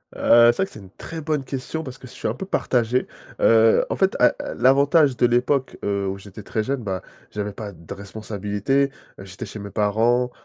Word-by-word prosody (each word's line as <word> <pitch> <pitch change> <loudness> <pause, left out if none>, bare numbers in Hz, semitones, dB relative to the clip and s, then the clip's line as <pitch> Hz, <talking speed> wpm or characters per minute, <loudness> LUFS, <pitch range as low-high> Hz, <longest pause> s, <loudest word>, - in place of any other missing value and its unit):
Heu, 120 0 +6
c'est - - -14
vrai 190 - +2
que - - -16
c'est - - -11
une 95 -2 -13
très 165 +10 -8
bonne 150 -2 -1
question, 135 +4 -5
parce 130 -3 -8
que 130 - -12
je - - -13
suis - - -4
un - - -1
peu 195 - -6
partagé. 125 -8 0 0.3
Heu, 115 0 +5
en - - -1
fait, - - +2
a - - +6 0.2
l'avantage 140 +2 +4
de 120 - +4
l'époque, 125 +3 +1
heu, 100 -1 -1
où 95 0 -3
j'étais 100 +1 -11
très 110 +1 -2
jeune, 135 +3 -2
ben, 95 -5 -3 0.3
j'avais 105 0 -4
pas 100 -1 -7
de 85 0 -10
responsabilité, 105 +6 -2 0.3
heu, 95 - -9
j'étais 95 +5 -8
chez 105 +1 -9
mes 100 0 -7
parents, 115 +4 +1
115 Hz, 220 wpm, -23 LUFS, 100-135 Hz, 0.3 s, Heu